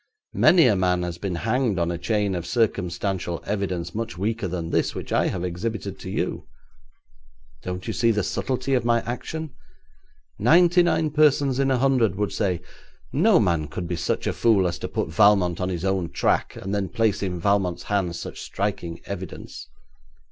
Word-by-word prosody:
Many 175 -3 +6
a 115 -5 +4
man 90 -1 +1
has 85 -1 -5
been 95 -2 -3
hanged 115 +2 0
on 85 0 0
a 85 - -3
chain 100 +2 0
of 90 -1 -4
circumstantial 95 -5 -1
evidence 90 -4 -2
much 110 -6 -4
weaker 105 +2 -1
than 85 -2 -4
this - - 0
which - - -5
I - - +3
have 90 - -3
exhibited 100 +3 -4
to - - -7
you. - - -3 1.1
Don't 90 0 -5
you - - -3
see 115 - +2
the 105 -3 +1
subtlety 130 +5 -2
of 125 -3 +2
my 115 0 +2
action? 150 +6 -5 0.9
Ninety 175 - +5
nine 160 -3 +1
persons 145 -3 +3
in 135 0 +2
a 130 - +2
hundred 125 -7 +2
would 105 +1 -2
say: 95 -5 -1 0.5
"No - - +5
man 85 -4 +1
could 85 +4 -5
be 85 - -2
such 85 - -2
a - - 0
fool 105 -6 +3
as 85 0 -4
to - - -4
put - - -2
Valmont 90 -1 +4
on 90 - -1
his 90 0 -3
own 95 -3 0
track, - - 0
and 95 +1 -5
then 100 -2 -1
place 110 -3 +1
in 90 -3 -2
Valmont's 95 -1 +1
hands 95 -4 -1
such - - -7
striking 90 -4 -3
evidence." 95 -9 -7
100 Hz, 185 wpm, -24 LUFS, 90-115 Hz, 1.1 s, Many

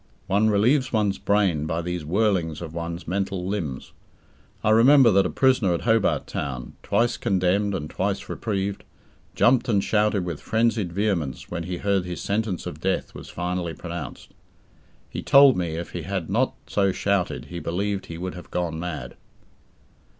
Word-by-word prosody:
One 105 +3 +2
relieves 125 +7 +3
one's 105 -3 +1
brain 95 -7 +1
by 80 +2 -2
these 90 0 -3
whirlings 90 -2 0
of 80 -2 -7
one's 85 +1 -5
mental 95 0 -2
limbs. 85 -10 -4 0.7
I 105 - +3
remember 125 +2 +7
that 95 -1 +4
a - - -5
prisoner 130 -9 +3
at - - -4
Hobart 115 -2 +2
Town, 65 -3 -5
twice 120 -1 +1
condemned 95 +2 +1
and 75 -5 -4
twice 100 +4 -2
reprieved, 100 -2 -3 0.5
jumped 125 +1 +3
and 100 -3 +2
shouted 105 -3 +1
with 85 -4 -5
frenzied 110 -5 +1
vehemence 85 - -2
when 85 -1 -3
he 90 0 -3
heard 100 -2 0
his 90 -1 -5
sentence 100 -2 -2
of 75 - -7
death 95 +1 -1
was - - -10
finally 90 -1 -3
pronounced. 85 0 -7 0.8
He - - -6
told 140 -1 +7
me, 85 -3 -2
if 85 +1 -5
he 90 - -4
had 90 0 -4
not 125 +6 +1
so 100 -2 +1
shouted, 100 -1 -1
he 85 - -3
believed 95 +4 -2
he 85 - -7
would 90 +1 -4
have 90 -1 -10
gone 85 -2 -2
mad. 85 -1 -5
95 Hz, 165 wpm, -24 LUFS, 85-105 Hz, 0.8 s, remember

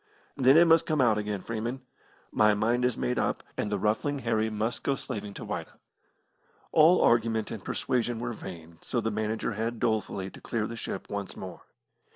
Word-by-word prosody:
"Then 135 +1 +6
it 170 - +8
must 165 -1 +5
come 155 -1 +1
out 115 -5 +4
again, 105 -2 -3
Freeman. 115 +3 -3 0.5
My 105 -1 +4
mind 120 +4 +1
is 125 -2 0
made 125 - 0
up, - - -1
and 105 - -2
the 105 - +1
Ruffling 110 +9 0
Harry 110 -4 0
must 110 +2 -2
go 140 - 0
slaving 105 -7 -6
to - - -7
Whydah." - - -5 0.9
All 160 +4 +6
argument 115 -2 +2
and 110 -5 -6
persuasion 120 -1 -1
were 120 +1 -3
vain, 85 -5 -10
so 120 - -2
the 115 -1 -1
manager 110 +2 -1
had 115 +2 -3
dolefully 100 -4 -1
to - - -13
clear 115 -3 -2
the 115 - -5
ship - - -5
once 100 -2 -4
more. 95 -1 -8
110 Hz, 190 wpm, -28 LUFS, 105-125 Hz, 0.9 s, it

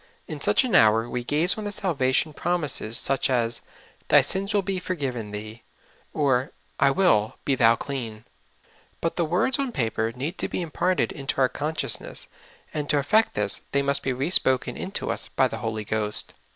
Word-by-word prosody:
In - - -7
such - - +3
an 250 - -3
hour 110 +1 +5
we 125 0 -4
gaze 160 - +1
on - - -5
the 205 - -4
salvation 155 -6 0
promises, 150 -10 0
such 135 0 +2
as, 120 -2 0 0.5
"Thy - - +6
sins 195 +2 +1
will 205 -2 +1
be 190 0 -2
forgiven 135 - -4
thee," 110 +2 -8 0.5
or, 135 -4 0
" - - -38
I 140 - +5
will, 135 - +2
be 140 - +2
thou 115 -3 +4
clean; 115 -5 -6 0.3
' - - -35
' - - -34
but 165 - -2
the 175 - +1
words 180 - +1
on 275 -3 -1
paper 115 - -1
need 140 +10 -5
to - - -1
be 180 - -2
im 165 - -8
parted 180 +3 0
into 135 -1 -4
our 130 -1 +4
consciousness, 150 +2 -2 0.5
and 145 -2 -3
to 145 - +2
effect 215 +11 +2
this, 105 -1 +1
they 140 0 +2
must 140 0 +2
be 135 - -1
re 135 +7 -2
spoken 130 -8 +2
into - - -4
us - - -3
by - - +1
the - - -6
Holy 110 -1 -3
Ghost. 105 0 +2
135 Hz, 200 wpm, -25 LUFS, 115-170 Hz, 0.5 s, Thy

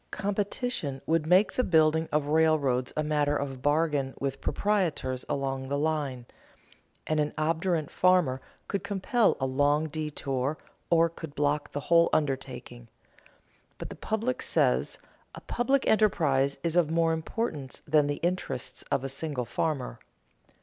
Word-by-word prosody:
Competition 200 - -2
would 160 -1 +1
make 185 +5 +4
the 255 - +1
building 160 -3 +3
of 150 -1 +1
railroads 145 -5 +2
a 155 - +1
matter 150 -1 +1
of 135 -2 -5
bargain 145 -2 +1
with 135 0 -3
proprietors 165 -11 -1
along 135 -2 -2
the 140 - 0
line, 145 -5 -1 0.8
and 155 0 0
an 150 0 -1
obdurate 160 0 0
farmer 180 -8 +3 0.3
could 200 - -2
compel 205 +3 +1
a 135 - 0
long 145 +4 +2
detour 145 -2 -2 0.3
or 165 0 +5
could 160 -3 -9
block 145 0 0
the 145 - -4
whole 170 +3 +4
undertaking. 130 -4 -2 0.9
But - - -7
the - - -8
public 225 +4 -2
says: - - +1 0.4
a - - -9
public 265 +3 0
enterprise 145 -11 +2
is 170 -1 -1
of 175 -4 +3
more 165 0 +2
importance 160 - -4
than 150 -1 +4
the 145 0 -2
interests 175 -8 -3
of 130 - +1
a - - -2
single 135 -2 -3
farmer. 125 - -2
150 Hz, 145 wpm, -28 LUFS, 135-170 Hz, 0.9 s, or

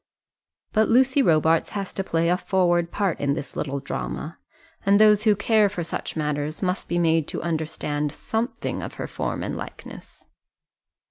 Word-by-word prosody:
But 220 0 +3
Lucy 260 +3 +4
Robarts 160 - +3
has 195 -1 -4
to 195 - -2
play 165 -2 0
a 180 - +4
forward 175 -3 +1
part 195 -5 -1
in 140 0 +1
this 145 - -7
little 140 -1 -2
drama, 60 - -5 0.4
and 200 +1 +4
those 215 0 +5
who 210 -2 +5
care 210 0 +3
for 180 -4 -4
such 165 - -5
matters 150 +1 -2
must 180 +1 -1
be 175 - -1
made 165 -2 +2
to - - -4
understand 155 -3 -2
something 225 - -3
of - - -7
her - - -4
form - - -3
and - - -3
likeness. - - -10
175 Hz, 170 wpm, -24 LUFS, 155-205 Hz, 0.4 s, those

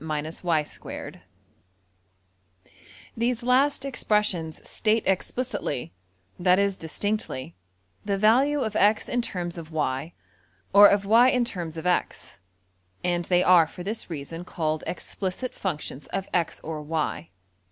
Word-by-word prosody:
\end{DPalign*} 155 +1 -3 1.9
These 235 +1 0
last 265 +3 +3
expressions 210 - -1
state 220 +1 +1
explicitly 195 - -2 0.5
(that 180 +1 +4
is, 200 -1 +2
distinctly) 165 - -3 0.5
the 200 -1 -1
value 260 +8 +4
of 220 -4 -2
$x$ 210 +2 +3
in 245 - 0
terms 175 -6 -4
of~$y$, 155 -1 -3 0.6
or 205 +1 +10
of 200 0 +2
$y$ 230 +5 +6
in 250 -2 +2
terms 170 -7 -5
of~$x$, 175 - -2 0.6
and 175 -1 0
they 180 0 +3
are 175 -3 +6
for 180 +3 -9
this 215 +2 -3
reason 165 +2 -6
called 155 -3 -2
\emph{explicit 190 +6 -4
functions} 150 -6 -5
of 195 0 -3
$x$~or~$y$. 155 - -2
180 Hz, 110 wpm, -26 LUFS, 160-215 Hz, 1.9 s, or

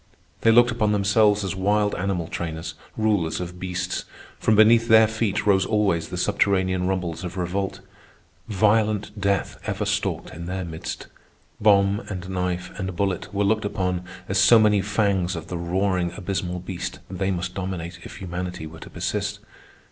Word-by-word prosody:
They 115 - +5
looked 120 +1 +6
upon 110 -3 +1
themselves 105 0 +3
as 95 - -2
wild 105 +2 +1
animal 90 -3 -2
trainers, 80 -1 -4 0.2
rulers 105 -7 +1
of 90 0 -6
beasts. 90 0 -3 0.3
From 110 - +3
beneath 115 +2 +6
their 110 -1 +7
feet 110 -2 -1
rose 95 -2 +4
always 100 -6 +1
the 90 - -5
subterranean 95 -1 +1
rumbles 90 -3 -2
of 90 +1 -6
revolt. 95 +2 -2 0.7
Violent 105 0 +1
death 100 -1 0
ever - - -1
stalked - - -1
in 85 +1 -7
their 95 0 -3
midst; 80 -1 -6 0.5
bomb 100 -1 +4
and 90 -3 -5
knife 90 -1 -2
and 95 -1 -3
bullet 95 -1 -1
were 100 0 0
looked 110 +2 +2
upon 90 -3 -1 0.3
as 95 0 +1
so 115 - +7
many 105 -2 +4
fangs 100 -3 0
of 80 0 -7
the 90 - -3
roaring 90 0 0
abysmal 90 -2 -3
beast 90 0 -5
they 95 0 -2
must 90 -1 -2
dominate 90 -2 -5
if - - -10
humanity 90 -2 -5
were 80 +1 -10
to - - -10
persist. - - -2
95 Hz, 165 wpm, -24 LUFS, 90-105 Hz, 0.7 s, their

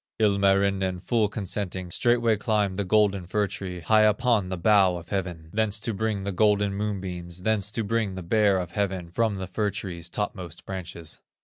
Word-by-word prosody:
Ilmarinen, 100 -2 +2
full 110 +3 +1
consenting, 95 -3 -3
Straightway 120 +2 +2
climbed 105 -2 0
the 100 - -1
golden 100 -2 +2
fir 105 +2 +1
tree, 95 -2 -6
High 110 +5 +4
upon 110 -2 +3
the 95 - -3
bow 95 0 +4
of 85 0 -11
heaven, 90 -5 -4
Thence 110 0 0
to 115 - -2
bring 105 -1 -1
the 100 - -2
golden 105 0 +2
moonbeams, 90 -4 -4
Thence 105 -2 +1
to 115 - -1
bring 105 -2 -1
the 95 - -6
Bear 100 +1 +3
of 90 -2 -4
heaven, 95 -3 -2
From 110 +2 +1
the 95 -1 -4
fir 105 +3 -1
tree's 90 -4 -5
topmost 90 -4 -5
branches. 85 -4 -7
100 Hz, 180 wpm, -26 LUFS, 90-105 Hz, -, High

